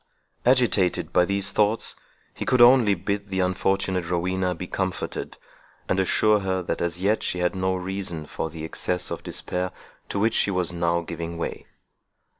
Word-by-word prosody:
Agitated 120 -8 +2
by 90 - +5
these 100 +1 -1
thoughts, 105 +1 +1 0.4
he - - -5
could 125 +1 +2
only 120 -4 +7
bid 100 +3 -3
the 95 -1 -2
unfortunate 95 -1 0
Rowena 90 +1 0
be 90 - -5
comforted, 95 0 -3 0.5
and 95 - +1
assure 105 +3 +3
her, 95 -1 -1
that - - -3
as 85 +1 -2
yet 105 +3 +2
she - - -1
had 90 +1 0
no 95 0 0
reason 95 -3 -4
for 80 - -4
the 80 0 -7
excess 90 +2 -2
of - - -4
despair 90 0 -3 0.4
to - - -3
which 110 +3 +2
she - - +3
was 90 -3 0
now 85 0 +1
giving 85 0 -5
way. 85 - -5
95 Hz, 170 wpm, -25 LUFS, 90-100 Hz, 0.5 s, only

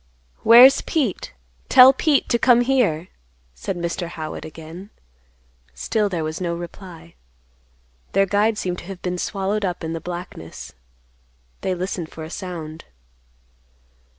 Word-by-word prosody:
"Where's 245 +4 +8
Pete? 270 - -2 0.4
Tell 255 +1 +9
Pete 290 +1 +1
to 235 - +2
come 245 -1 +5
here," 230 -11 +1 0.4
said - - -5
Mr. 170 0 -3
Howitt 160 -2 -7
again. 160 +5 -10 0.9
Still 210 - -1
there 170 -4 -2
was 155 +3 -4
on 170 -1 -2
reply. 170 -1 -10 1.0
Their 195 0 +4
guide 205 +3 +1
seemed 180 -3 -3
to - - -12
have 190 -1 -9
been 180 0 -3
swallowed 200 +3 -2
up 180 -3 -3
in 160 0 -3
the 165 - -5
blackness. 175 - -8 0.9
They 185 - -1
listened 180 -2 -4
for 160 - -9
a 160 - -9
sound. 165 -5 -7
180 Hz, 135 wpm, -22 LUFS, 165-210 Hz, 1.0 s, Tell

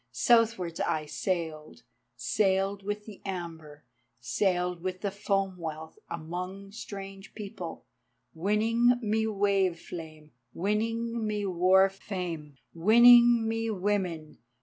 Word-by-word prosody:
Southwards 225 -8 +2
I 155 -1 0
sailed, 155 -6 -4 0.3
Sailed 190 - +1
with 205 +1 -4
the 210 -3 -11
amber, 165 -6 -7 0.4
Sailed 180 +8 0
with 185 0 -4
the 200 - -1
foam 195 -1 -1
wealth. 160 -1 -7
Among 180 +4 -6
strange 195 -2 -9
peoples, 195 -5 -7 0.5
Winning 225 +7 +2
me 220 +1 +1
wave 195 -4 +1
flame,[*] 155 -3 -9 0.2
Winning 225 +4 -1
me 210 -1 -2
war 185 +1 +4
fame, 180 -7 -6 0.2
Winning 235 +5 +7
me 225 0 -1
women. 185 -6 -2
195 Hz, 105 wpm, -29 LUFS, 170-210 Hz, 0.5 s, Winning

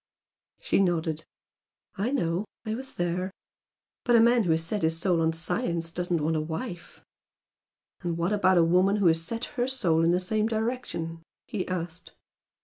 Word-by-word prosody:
She - - +1
nodded. 165 -4 0 0.7
"I 210 +4 -1
know! 180 -9 0 0.2
I 215 - -2
was 265 +3 -5
there. 175 +2 -1 0.7
But 240 - +4
a - - +7
man 235 -1 +5
who - - -1
has 160 0 +2
set 200 +5 -2
his 160 0 +1
soul 170 -1 +2
on 160 0 +3
science 165 0 -2
doesn't 175 -2 -1
want 160 +1 +1
a 155 - +1
wife." 170 +4 -6 1.0
"And 170 -3 -2
what 170 +4 0
about 185 -3 +4
a 170 - +6
woman 180 +4 +4
who 205 -2 +1
has 165 -1 +4
set 230 +7 -3
her 245 +1 +2
soul 170 -12 +2
in 165 - +4
the 175 +1 +3
same 215 +4 0
direction?" 220 -8 -3 0.2
he 190 -4 -3
asked. 175 -1 -4
175 Hz, 175 wpm, -27 LUFS, 165-210 Hz, 1.0 s, a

